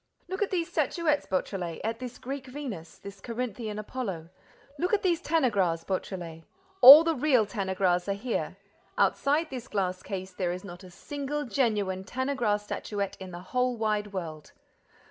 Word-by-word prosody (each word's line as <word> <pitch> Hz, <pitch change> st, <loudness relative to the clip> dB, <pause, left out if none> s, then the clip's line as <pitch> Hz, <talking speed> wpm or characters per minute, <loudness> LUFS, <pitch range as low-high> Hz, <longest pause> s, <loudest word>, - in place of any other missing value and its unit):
Look 375 Hz, +3 st, -4 dB
at 410 Hz, -, +2 dB
these 345 Hz, -3 st, -1 dB
statuettes, 335 Hz, -4 st, 0 dB
Beautrelet, 185 Hz, -3 st, -2 dB
at 225 Hz, +1 st, -2 dB
this 250 Hz, -1 st, -7 dB
Greek 270 Hz, +1 st, -6 dB
Venus, 250 Hz, -, -7 dB
this 200 Hz, -1 st, -11 dB
Corinthian 230 Hz, -2 st, -4 dB
Apollo. 200 Hz, -7 st, -5 dB, 0.5 s
Look 360 Hz, +6 st, +2 dB
at 405 Hz, -, -3 dB
these 345 Hz, -3 st, +2 dB
Tanagras, 205 Hz, -, +1 dB
Beautrelet: 175 Hz, -4 st, -4 dB, 0.4 s
all 285 Hz, +5 st, +13 dB
the 330 Hz, 0 st, +1 dB
real 255 Hz, -5 st, +3 dB
Tanagras 190 Hz, -3 st, 0 dB
are -, -, +2 dB
here. 225 Hz, +5 st, -3 dB, 0.4 s
Outside 305 Hz, +3 st, +2 dB
this 255 Hz, -1 st, -6 dB
glass 185 Hz, -3 st, -1 dB
case, 190 Hz, -2 st, -6 dB
there 180 Hz, -1 st, -1 dB
is 180 Hz, -, -7 dB
not 180 Hz, -1 st, -10 dB
a 185 Hz, -, -11 dB
single 285 Hz, +9 st, -4 dB
genuine 210 Hz, -8 st, 0 dB
Tanagra 245 Hz, -1 st, 0 dB
statuette 205 Hz, -1 st, -4 dB
in 190 Hz, -1 st, -7 dB
the 175 Hz, 0 st, -8 dB
whole 250 Hz, -1 st, +1 dB
wide 210 Hz, -2 st, -1 dB
world. 160 Hz, -5 st, -6 dB
215 Hz, 160 wpm, -28 LUFS, 190-270 Hz, 0.5 s, all